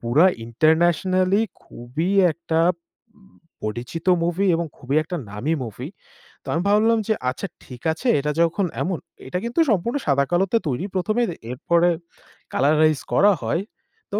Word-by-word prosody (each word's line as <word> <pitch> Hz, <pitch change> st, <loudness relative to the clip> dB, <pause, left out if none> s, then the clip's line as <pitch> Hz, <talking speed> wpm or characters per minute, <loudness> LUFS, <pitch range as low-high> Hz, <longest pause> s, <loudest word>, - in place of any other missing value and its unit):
পুরা 135 Hz, +10 st, +4 dB, 0.2 s
internationally 175 Hz, -, +2 dB, 0.2 s
খুবই 140 Hz, +10 st, -4 dB, 0.2 s
একটা 165 Hz, -1 st, -1 dB, 1.0 s
পরিচিত 120 Hz, +10 st, -5 dB, 0.2 s
movie 175 Hz, +3 st, +1 dB
এবং 170 Hz, 0 st, -1 dB
খুবই 135 Hz, +3 st, -2 dB
একটা 175 Hz, +3 st, -5 dB
নামী 120 Hz, +10 st, -2 dB
movie। 125 Hz, -, -7 dB, 0.5 s
তো -, -, -20 dB
আমি 165 Hz, -, 0 dB
ভাবলাম 220 Hz, +2 st, +4 dB
যে, 220 Hz, -, +3 dB, 0.2 s
"আচ্ছা 130 Hz, +10 st, -4 dB, 0.2 s
ঠিক 125 Hz, -2 st, -11 dB
আছে 245 Hz, -, -5 dB
এটা 150 Hz, +1 st, -1 dB
যখন 170 Hz, +4 st, +2 dB, 0.2 s
এমন," 180 Hz, -2 st, -1 dB, 0.3 s
এটা 180 Hz, -, -2 dB
কিন্তু 240 Hz, +7 st, -2 dB
সম্পূর্ণ 225 Hz, +7 st, 0 dB
সাদাকালোতে 175 Hz, +9 st, +2 dB
তৈরি 140 Hz, +8 st, -2 dB
প্রথমে 215 Hz, +6 st, 0 dB, 0.3 s
এরপরে 170 Hz, +7 st, +2 dB, 0.6 s
colorize 155 Hz, +1 st, +3 dB
করা 205 Hz, +1 st, +5 dB
হয়। 170 Hz, -, 0 dB, 0.5 s
তো 205 Hz, -, 0 dB
170 Hz, 135 wpm, -22 LUFS, 140-190 Hz, 1.0 s, করা